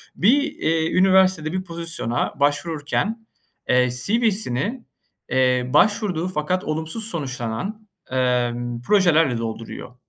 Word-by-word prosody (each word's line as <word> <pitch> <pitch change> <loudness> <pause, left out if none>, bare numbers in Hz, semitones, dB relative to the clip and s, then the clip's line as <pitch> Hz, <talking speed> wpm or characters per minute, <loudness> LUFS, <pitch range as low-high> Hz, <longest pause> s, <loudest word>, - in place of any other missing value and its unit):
Bir, 250 +10 +4
eee, 165 - -1
üniversitede 185 -4 +4
bir 185 0 -2
pozisyona 165 -8 -3
başvururken, 160 +9 -1 0.4
eee, 125 0 +4
CV'sini, 215 - 0 0.4
eee, 125 -1 +2
başvurduğu 205 -6 +2
fakat 185 +1 -1
olumsuz 160 +7 -3
sonuçlanan, 155 - -4 0.2
emm, 120 -2 0
projelerle 165 - +3
dolduruyor 115 +2 -6
160 Hz, 95 wpm, -22 LUFS, 125-190 Hz, 0.4 s, Bir